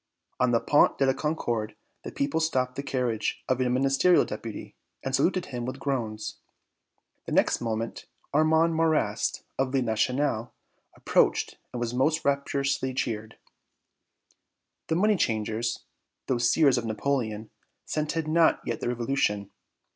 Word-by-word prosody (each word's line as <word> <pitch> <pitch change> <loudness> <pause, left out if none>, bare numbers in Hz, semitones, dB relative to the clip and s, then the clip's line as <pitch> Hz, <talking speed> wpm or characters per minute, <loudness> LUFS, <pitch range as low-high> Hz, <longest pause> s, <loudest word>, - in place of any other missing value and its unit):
On 125 - +3
the 115 -1 +3
Pont 145 - +3
de 135 - +3
la 135 - +3
Concorde 120 -9 -2 0.3
the - - -6
people 140 +3 -1
stopped 130 -6 0
the 140 - -3
carriage 125 -5 -2
of 130 -1 +1
a 125 - +2
Ministerial 135 +7 +4
Deputy 110 +1 -7 0.3
and 135 0 0
saluted 180 +6 +1
him 125 -2 -5
with 130 +2 -4
groans. 115 -6 -3 0.9
The - - -5
next - - +3
moment 115 -1 -3 0.3
Armand 160 +2 +4
Marrast, 160 -1 +1 0.2
of 135 -1 +1
"Le 135 -1 +1
National," 120 +1 0 0.4
approached - - +1
and 125 - -5
was 120 0 -2
most 150 +6 +1
rapturously 140 -2 0
cheered. 110 -4 -3 1.5
The 160 - 0
money 210 +3 +3
changers, 110 -1 -1 0.4
those 120 -2 +1
seers 140 -6 +4
of 115 - -6
Napoleon, 110 -1 -2 0.3
scented 155 +1 -2
not 160 +1 +4
yet 115 - -2
the - - -2
revolution. 115 -5 -1
130 Hz, 140 wpm, -27 LUFS, 115-145 Hz, 1.5 s, Ministerial